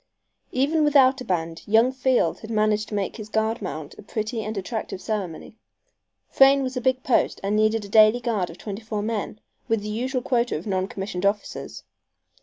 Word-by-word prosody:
Even 295 +5 +2
without 275 -3 +4
a - - -4
band 165 -5 -2
young 225 +4 +4
Field 260 -1 +1
had 220 - -10
managed 215 -1 +1
to 210 - -4
make 200 +1 -2
his 215 -1 -8
guard 220 +1 0
mount 155 -6 -6
a - - -8
pretty 215 +2 -3
and 215 0 -4
attractive 205 0 -4
ceremony. 205 -1 -5 0.7
Frayne 275 0 +5
was 255 0 -3
a 250 - -2
big 260 +1 +1
post 255 - +1
and 200 +2 0
needed 215 0 +2
a - - -8
daily 215 +3 +6
guard 220 -7 -1
of 165 - -11
twenty 205 0 -6
four 215 -2 -4
men, 215 -1 -3 0.3
with 225 -2 +1
the 210 - -4
usual 250 +4 -2
quota 240 -5 +1
of 160 - -9
non 190 -2 -1
commissioned 195 -2 -5
officers. 200 +1 -2
220 Hz, 195 wpm, -24 LUFS, 205-245 Hz, 0.7 s, daily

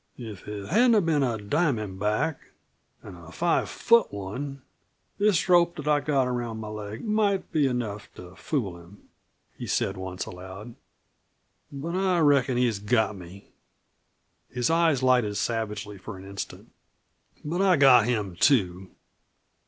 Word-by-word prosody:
"If 110 -6 -9
it 105 -1 -6
hadn't 225 -1 +4
been 155 -3 +2
a 120 -4 0
diamond 110 - -1
back 105 +8 -2 0.5
an' 100 - -10
a 85 0 -13
five 170 - 0
foot 235 -1 +3
one 130 +8 -6 0.6
this 205 -4 +2
rope 175 -1 +4
that 150 -1 -7
I've 145 -2 +2
got 140 -4 +2
around 120 -3 -3
my 110 -1 -6
leg 105 - -7
might 210 -3 0
be 150 -3 +2
enough 115 -5 -4
to 90 +1 -12
fool 100 - -3
him," 85 +4 -18 0.5
he - - -5
said - - -1
once, 95 0 -5
aloud. 95 +5 -9 1.0
"But 150 +5 -5
I 185 -1 +1
reckon 140 -5 +3
he's 120 -5 +1
got 105 0 +1
me." 95 +1 -12 1.0
His 125 +3 -1
eyes 165 -5 +2
lighted 125 -5 +2
savagely 105 -2 -3
for 95 +1 -8
an 95 - -11
instant. 100 0 -8 0.7
"But 170 +5 -1
I 190 -2 +5
got 130 -5 +7
him, 105 -7 -1
too. 95 -6 +2
120 Hz, 145 wpm, -26 LUFS, 100-150 Hz, 1.0 s, got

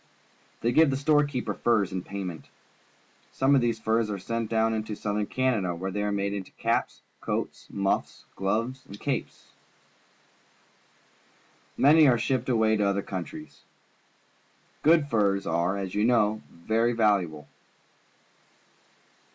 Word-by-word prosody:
They 120 - +1
give 160 +4 +5
the 135 - 0
store 150 +1 +3
keeper 135 -4 -3
furs 110 -5 +1
in 95 -1 -3
payment. 95 -4 -6 0.8
Some 135 +1 +2
of 135 - +5
these 115 -2 0
furs 110 0 0
are 100 - -3
sent 115 +3 -3
down 115 0 +1
into 110 -1 -3
Southern 105 0 -2
Canada, 110 -9 0
where 95 +3 -4
they 105 +2 -2
are 105 0 -1
made 100 0 -1
into 100 -2 -5
caps, - - -1 0.2
coats, - - -4
muffs, 100 -1 -2
gloves, 115 +7 -1
and 100 +1 -11
capes. 140 -3 -4 2.3
Many 150 +2 +6
are 125 -2 +4
shipped 130 +2 -1
away 110 -2 +3
to 105 - +1
other 100 0 0
countries. 100 - -7 1.2
Good 160 -2 +4
furs 100 -6 +1
are, 85 +4 0
as 95 -2 -4
you 105 - +1
know, 110 -2 +2
very 110 +7 0
valuable. 95 -10 +1
110 Hz, 135 wpm, -27 LUFS, 100-120 Hz, 2.3 s, Many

